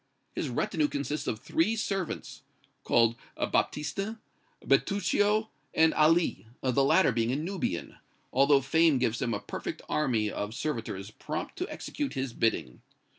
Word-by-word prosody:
His 150 Hz, -, -2 dB
retinue 155 Hz, -, 0 dB
consists 145 Hz, +1 st, -3 dB
of 110 Hz, -, -1 dB
three 185 Hz, -, +1 dB
servants, 195 Hz, -5 st, -3 dB, 0.4 s
called 115 Hz, -1 st, +3 dB, 0.2 s
Baptistin, 195 Hz, +9 st, -1 dB, 0.5 s
Bertuccio 205 Hz, +2 st, +2 dB, 0.3 s
and 160 Hz, 0 st, +5 dB
Ali, 160 Hz, -5 st, +3 dB
the 130 Hz, +1 st, +2 dB
latter 140 Hz, +2 st, +5 dB
being 115 Hz, 0 st, 0 dB
a -, -, 0 dB
Nubian, 160 Hz, -, -3 dB, 0.4 s
although 140 Hz, +1 st, +5 dB
fame 160 Hz, +2 st, +4 dB
gives 120 Hz, -1 st, 0 dB
him 120 Hz, -4 st, 0 dB
a -, -, -3 dB
perfect -, -, -6 dB
army 115 Hz, -8 st, +1 dB
of 105 Hz, +2 st, -4 dB
servitors 115 Hz, -8 st, -3 dB
prompt 155 Hz, +7 st, -5 dB
to 365 Hz, -, -3 dB
execute 290 Hz, -, -4 dB
his 130 Hz, -2 st, -2 dB
bidding. 70 Hz, -, -1 dB
145 Hz, 135 wpm, -29 LUFS, 115-175 Hz, 0.5 s, and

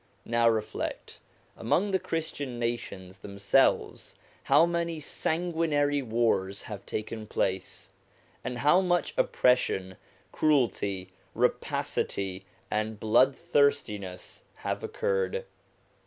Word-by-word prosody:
Now 115 Hz, 0 st, +3 dB
reflect: 110 Hz, -2 st, -3 dB, 0.4 s
among 200 Hz, +3 st, +1 dB
the 190 Hz, -, +2 dB
Christian 145 Hz, -7 st, -3 dB
nations 100 Hz, -6 st, -4 dB
themselves 100 Hz, 0 st, +1 dB, 0.3 s
how 145 Hz, +4 st, +6 dB
many 170 Hz, -1 st, -1 dB
sanguinary 160 Hz, -2 st, 0 dB
wars 110 Hz, -5 st, 0 dB
have 105 Hz, -2 st, -8 dB
taken 110 Hz, 0 st, -4 dB
place, 95 Hz, -2 st, -2 dB, 0.5 s
and 125 Hz, -, -3 dB
how 150 Hz, +8 st, +5 dB
much 175 Hz, -3 st, +1 dB
oppression, 95 Hz, -7 st, +2 dB, 0.3 s
cruelty, 100 Hz, -10 st, +1 dB, 0.2 s
rapacity, 95 Hz, -1 st, -1 dB, 0.3 s
and 110 Hz, 0 st, -1 dB
bloodthirstiness 130 Hz, -, +1 dB
have -, -, -4 dB
occurred! 475 Hz, 0 st, -1 dB
120 Hz, 90 wpm, -28 LUFS, 100-160 Hz, 0.5 s, how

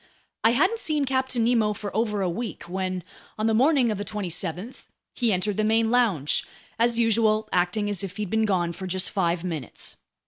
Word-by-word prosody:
I 225 Hz, -, +5 dB
hadn't 385 Hz, -, +2 dB
seen 300 Hz, -6 st, 0 dB
Captain 260 Hz, -2 st, 0 dB
Nemo 225 Hz, -3 st, +2 dB
for 205 Hz, -1 st, -7 dB
over 210 Hz, -3 st, 0 dB
a -, -, +1 dB
week, 180 Hz, -1 st, -4 dB
when, 185 Hz, +1 st, -3 dB, 0.3 s
on 215 Hz, -, -1 dB
the 225 Hz, -, +3 dB
morning 260 Hz, 0 st, +4 dB
of 210 Hz, -, -3 dB
the -, -, -2 dB
27th, 185 Hz, +2 st, -4 dB, 0.3 s
he 235 Hz, -3 st, +1 dB
entered 195 Hz, +1 st, 0 dB
the 215 Hz, -, +1 dB
main 225 Hz, +1 st, +2 dB
lounge, 205 Hz, -, +2 dB, 0.4 s
as 235 Hz, 0 st, +3 dB
usual 220 Hz, -1 st, +2 dB
acting 180 Hz, +4 st, +1 dB
as 205 Hz, -1 st, -1 dB
if 195 Hz, +1 st, -6 dB
he'd 210 Hz, -3 st, -4 dB
been 220 Hz, 0 st, +2 dB
gone 175 Hz, -4 st, 0 dB
for 190 Hz, +2 st, -6 dB
just 185 Hz, 0 st, -1 dB
five 175 Hz, -3 st, 0 dB
minutes. 165 Hz, -6 st, -4 dB
210 Hz, 195 wpm, -25 LUFS, 185-230 Hz, 0.4 s, I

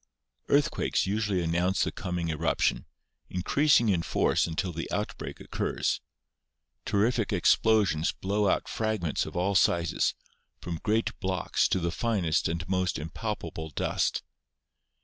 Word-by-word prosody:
Earthquakes 145 Hz, 0 st, +2 dB
usually 100 Hz, -2 st, 0 dB
announce 85 Hz, +3 st, +1 dB
the -, -, -1 dB
coming 90 Hz, -2 st, -3 dB
eruption, 80 Hz, +1 st, 0 dB, 0.4 s
increasing 120 Hz, +7 st, +3 dB
in 95 Hz, -5 st, +2 dB
force 85 Hz, -, +1 dB
until 85 Hz, +3 st, -2 dB
the 80 Hz, +1 st, -5 dB
outbreak -, -, -4 dB
occurs. -, -, -2 dB, 0.8 s
Terrific 110 Hz, +2 st, +1 dB
explosions 100 Hz, -3 st, +3 dB
blow 100 Hz, +1 st, 0 dB
out -, -, 0 dB
fragments 110 Hz, -8 st, -1 dB
of -, -, -9 dB
all 95 Hz, +3 st, +1 dB
sizes, 85 Hz, -3 st, +2 dB, 0.4 s
from 85 Hz, -2 st, -5 dB
great 110 Hz, +1 st, +1 dB
blocks 95 Hz, -3 st, 0 dB
to -, -, +1 dB
the 85 Hz, -1 st, -1 dB
finest 90 Hz, -6 st, 0 dB
and 85 Hz, 0 st, -3 dB
most 95 Hz, -1 st, 0 dB
impalpable 80 Hz, -1 st, -5 dB
dust. 75 Hz, -, -1 dB
90 Hz, 125 wpm, -28 LUFS, 85-105 Hz, 0.8 s, increasing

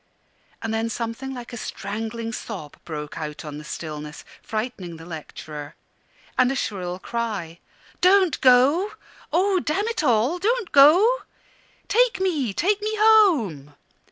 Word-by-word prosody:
And 225 Hz, 0 st, -2 dB
then 225 Hz, +1 st, 0 dB
something 230 Hz, +4 st, -4 dB
like 245 Hz, -2 st, -8 dB
a -, -, -5 dB
strangling 225 Hz, +2 st, -5 dB
sob 185 Hz, -11 st, -7 dB
broke 150 Hz, -1 st, -6 dB
out 150 Hz, 0 st, -6 dB
on 150 Hz, -1 st, -6 dB
the -, -, -9 dB
stillness, 150 Hz, -1 st, -7 dB, 0.2 s
frightening 215 Hz, -7 st, -4 dB
the 165 Hz, -, -11 dB
lecturer; 150 Hz, -2 st, -8 dB, 0.6 s
and 255 Hz, 0 st, +5 dB
a -, -, -2 dB
shrill 185 Hz, -7 st, -3 dB
cry 200 Hz, -7 st, -4 dB, 0.4 s
"Don't 370 Hz, -2 st, +4 dB
go 275 Hz, +11 st, +5 dB, 0.4 s
oh, 370 Hz, +4 st, +3 dB
damn 375 Hz, +7 st, -1 dB
it 460 Hz, -8 st, -2 dB
all! 250 Hz, +6 st, +2 dB
don't 445 Hz, 0 st, 0 dB
go! 350 Hz, -, +7 dB, 0.7 s
Take 485 Hz, -2 st, +3 dB
me 315 Hz, -, 0 dB
take 400 Hz, -, +1 dB
me 430 Hz, +1 st, -1 dB
home!" 290 Hz, -, +4 dB
235 Hz, 135 wpm, -24 LUFS, -, 0.7 s, go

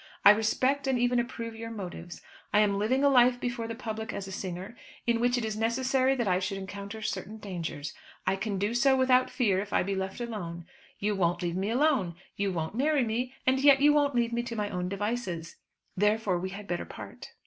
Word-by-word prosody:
I 200 Hz, -, +12 dB
respect 255 Hz, +6 st, +1 dB
and 265 Hz, -1 st, +2 dB
even 245 Hz, 0 st, +2 dB
approve 230 Hz, -1 st, -4 dB
your 230 Hz, 0 st, -6 dB
motives. 175 Hz, -5 st, -7 dB, 0.3 s
I 210 Hz, -, +5 dB
am 200 Hz, -1 st, +2 dB
living 255 Hz, +7 st, +1 dB
a -, -, +6 dB
life 250 Hz, -2 st, +5 dB
before 240 Hz, -2 st, -3 dB
the 230 Hz, -, -5 dB
public 220 Hz, -2 st, -5 dB
as 195 Hz, -, -5 dB
a -, -, -7 dB
singer, 185 Hz, +3 st, -5 dB, 0.3 s
in 235 Hz, -1 st, +2 dB
which 245 Hz, +1 st, +2 dB
it 240 Hz, -, -1 dB
is 215 Hz, -1 st, -2 dB
necessary 255 Hz, +4 st, +2 dB
that 240 Hz, -5 st, -1 dB
I 180 Hz, -1 st, +3 dB
should 195 Hz, +1 st, -2 dB
encounter 200 Hz, +3 st, -7 dB
certain 215 Hz, +1 st, -4 dB
dangers. 165 Hz, -8 st, -5 dB, 0.3 s
I -, -, +2 dB
can 200 Hz, +1 st, -3 dB
do 205 Hz, +4 st, 0 dB
so 265 Hz, +3 st, +4 dB
without 255 Hz, -1 st, +4 dB
fear, 205 Hz, -8 st, +1 dB
if 205 Hz, +1 st, -5 dB
I -, -, +2 dB
be 195 Hz, +2 st, -2 dB
left 190 Hz, +2 st, -3 dB
alone. 175 Hz, -8 st, -5 dB, 0.3 s
You 210 Hz, +1 st, 0 dB
won't 175 Hz, -1 st, +1 dB
leave 170 Hz, -1 st, -1 dB
me 190 Hz, +3 st, -1 dB
alone. 245 Hz, -, +2 dB, 0.2 s
You 200 Hz, -1 st, 0 dB
won't 160 Hz, -1 st, -3 dB
marry 280 Hz, +3 st, +2 dB
me, 245 Hz, +3 st, -2 dB
and 260 Hz, +1 st, +3 dB
yet 275 Hz, 0 st, +6 dB
you 295 Hz, +1 st, +6 dB
won't 285 Hz, -2 st, +2 dB
leave 235 Hz, -1 st, +1 dB
me 235 Hz, -, +1 dB
to 240 Hz, -1 st, -5 dB
my 210 Hz, -1 st, -2 dB
own 180 Hz, -1 st, -2 dB
devices; 200 Hz, -5 st, -3 dB, 0.4 s
therefore, 210 Hz, -2 st, +2 dB
we 185 Hz, +2 st, -3 dB
had 200 Hz, +2 st, -8 dB
better 175 Hz, -2 st, -2 dB
part." -, -, -10 dB
220 Hz, 220 wpm, -29 LUFS, 195-245 Hz, 0.4 s, I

